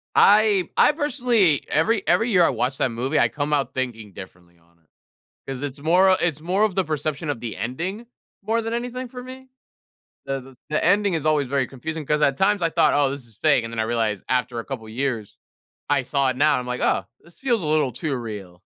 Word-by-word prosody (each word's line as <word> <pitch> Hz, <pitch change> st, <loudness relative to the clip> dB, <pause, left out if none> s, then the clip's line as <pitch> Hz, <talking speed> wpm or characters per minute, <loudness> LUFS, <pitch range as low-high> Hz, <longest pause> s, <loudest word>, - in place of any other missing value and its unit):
I 205 Hz, -3 st, +5 dB
I -, -, +6 dB
personally 245 Hz, -, +2 dB
every 200 Hz, +6 st, +1 dB
every 230 Hz, +2 st, +2 dB
year 180 Hz, -5 st, +5 dB
I -, -, +3 dB
watch 125 Hz, +4 st, -1 dB
that 130 Hz, -, +1 dB
movie, 120 Hz, +4 st, -1 dB
I -, -, +4 dB
come 150 Hz, 0 st, -3 dB
out 140 Hz, -2 st, 0 dB
thinking 115 Hz, -6 st, -4 dB
differently 90 Hz, -2 st, -13 dB
on 85 Hz, 0 st, -31 dB
it. 80 Hz, -, -36 dB, 0.6 s
'Cause 135 Hz, -1 st, -5 dB
it's 140 Hz, 0 st, -5 dB
more 180 Hz, +6 st, +4 dB
o -, -, +6 dB
it's 165 Hz, -4 st, 0 dB
more 185 Hz, +5 st, +1 dB
of 210 Hz, -4 st, +1 dB
the 190 Hz, -, +2 dB
perception 155 Hz, -1 st, -3 dB
of 145 Hz, -, -2 dB
the 115 Hz, -2 st, -6 dB
ending, 170 Hz, -, -4 dB, 0.4 s
more 225 Hz, +2 st, 0 dB
than 225 Hz, 0 st, -4 dB
anything 245 Hz, +2 st, -4 dB
for 250 Hz, +1 st, -9 dB
me. 260 Hz, +1 st, -11 dB, 0.8 s
The 135 Hz, -1 st, -2 dB
the 130 Hz, -, -14 dB
s 130 Hz, -, -20 dB
the 155 Hz, -, 0 dB
ending 200 Hz, +1 st, +3 dB
is 155 Hz, -2 st, -2 dB
always 150 Hz, -4 st, +2 dB
very 135 Hz, -1 st, 0 dB
confusing, 155 Hz, +4 st, -6 dB
'cause 150 Hz, 0 st, +1 dB
at 140 Hz, -2 st, +3 dB
times 200 Hz, +1 st, +2 dB
I 165 Hz, -, +2 dB
thought, 165 Hz, -1 st, +3 dB
"Oh, 145 Hz, -2 st, +3 dB
this 135 Hz, -3 st, -7 dB
is 110 Hz, -3 st, -20 dB
fake." 145 Hz, -6 st, +3 dB
And 115 Hz, -, -6 dB
then 115 Hz, -, -2 dB
I -, -, +2 dB
realized 110 Hz, -4 st, -1 dB
after 125 Hz, -2 st, 0 dB
a -, -, -9 dB
couple 110 Hz, -1 st, -7 dB
years 115 Hz, -3 st, -3 dB, 0.5 s
I 140 Hz, -2 st, +3 dB
saw 140 Hz, +1 st, 0 dB
it 130 Hz, -, -4 dB
now. 145 Hz, 0 st, +3 dB
I'm 125 Hz, -, -5 dB
like, 125 Hz, 0 st, -3 dB
"Oh, -, -, +1 dB
this 170 Hz, +1 st, -21 dB
feels 245 Hz, -5 st, 0 dB
a -, -, -3 dB
little 150 Hz, -4 st, +1 dB
too 140 Hz, +4 st, -3 dB
real." 100 Hz, -7 st, -8 dB
145 Hz, 235 wpm, -23 LUFS, 125-190 Hz, 0.8 s, I